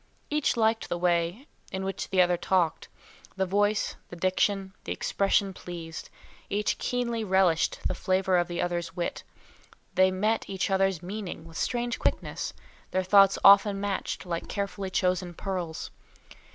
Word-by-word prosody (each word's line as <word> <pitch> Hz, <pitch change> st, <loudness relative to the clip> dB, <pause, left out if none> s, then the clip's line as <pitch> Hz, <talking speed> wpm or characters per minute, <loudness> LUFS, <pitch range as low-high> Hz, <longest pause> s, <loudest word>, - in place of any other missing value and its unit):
Each 300 Hz, -4 st, +1 dB
liked 225 Hz, 0 st, +1 dB
the 175 Hz, -, -1 dB
way 175 Hz, +6 st, 0 dB, 0.3 s
in 190 Hz, 0 st, -3 dB
which 195 Hz, 0 st, -4 dB
the 185 Hz, -1 st, +5 dB
other 175 Hz, 0 st, +2 dB
talked; 175 Hz, -2 st, 0 dB, 0.5 s
the 190 Hz, -1 st, +1 dB
voice, 205 Hz, +2 st, +1 dB
the -, -, -8 dB
diction, 190 Hz, +2 st, 0 dB
the -, -, -5 dB
expression 195 Hz, 0 st, +1 dB
pleased; 170 Hz, -3 st, -8 dB, 0.4 s
each 205 Hz, +1 st, 0 dB
keenly 235 Hz, -2 st, -1 dB
relished 190 Hz, -4 st, +2 dB
the -, -, -2 dB
flavour 185 Hz, 0 st, +1 dB
of 175 Hz, -, 0 dB
the 175 Hz, -1 st, -2 dB
other's 175 Hz, -1 st, -3 dB
wit; 175 Hz, -1 st, -3 dB, 0.7 s
they 185 Hz, 0 st, +5 dB
met 210 Hz, +4 st, 0 dB
each 190 Hz, 0 st, -1 dB
other's 190 Hz, -3 st, +1 dB
meaning 185 Hz, -3 st, -6 dB
with 165 Hz, 0 st, -13 dB
strange 240 Hz, -1 st, -1 dB
quickness, -, -, -1 dB, 0.4 s
their 185 Hz, -, 0 dB
thoughts 195 Hz, +1 st, +6 dB
often 200 Hz, 0 st, +7 dB
matched 200 Hz, -1 st, -3 dB
like 170 Hz, -2 st, -3 dB
carefully 200 Hz, -1 st, -3 dB
chosen 180 Hz, -1 st, 0 dB
pearls. 180 Hz, -5 st, -4 dB
190 Hz, 150 wpm, -28 LUFS, 175-200 Hz, 0.7 s, often